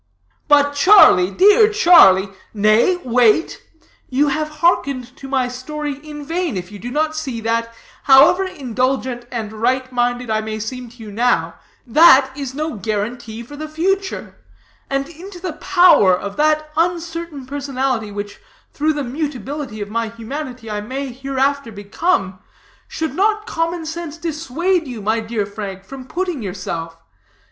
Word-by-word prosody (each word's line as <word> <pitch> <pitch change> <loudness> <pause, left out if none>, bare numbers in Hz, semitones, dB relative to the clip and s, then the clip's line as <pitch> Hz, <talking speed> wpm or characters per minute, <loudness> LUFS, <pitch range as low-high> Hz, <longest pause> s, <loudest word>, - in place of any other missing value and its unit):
"But 285 -1 +4
Charlie, 285 - +6
dear 415 - +5
Charlie 335 - +6 0.2
" - - -38
"Nay, 215 - +3
wait. 245 +4 +2 0.5
You 285 +3 +2
have 305 +2 -2
hearkened 270 -7 +1
to 270 - -9
my 265 -2 0
story 285 +3 -5
in 295 0 -10
vain, 330 - -2
if 180 +2 -7
you 205 - -10
do 240 - -6
not 310 +4 -1
see 270 -7 -4
that, 230 +1 -1 0.3
however 280 +8 +6
indulgent 255 -5 -2
and 220 -3 -5
right 255 +4 -1
minded 245 -1 -1
I 215 0 +1
may 215 0 -5
seem 245 +3 -6
to 235 - -18
you 210 - -9
now, 200 -7 +1 0.3
that 270 0 +6
is 275 -2 -6
no 310 -4 -3
guarantee 220 +2 -4
for 290 +5 -11
the 310 +1 -7
future. 380 +5 -2 0.5
And 275 0 -1
into 355 +3 -11
the 360 -2 -4
power 340 - +4
of 200 +1 -6
that 305 0 +1
uncertain 335 -3 -2
personality 265 -5 -2
which, 205 0 -7 0.3
through 310 +2 0
the 295 -1 -3
mutability 270 -3 -5
of 205 0 -6
my 230 0 -1
humanity, 245 +2 -7
I 210 0 -3
may 260 +5 -5
hereafter 270 0 -1
become, 200 - -1 0.5
should 320 -4 -4
not 425 +5 +1
common 330 -4 -2
sense 325 0 -6
dissuade 330 +1 -1
you, 245 -3 -6
my 220 +2 0
dear 220 -2 -3
Frank, 200 -2 -7
from 260 +3 -10
putting 355 -5 -3
yourself? 170 -4 -5
265 Hz, 155 wpm, -19 LUFS, 225-310 Hz, 0.5 s, Charlie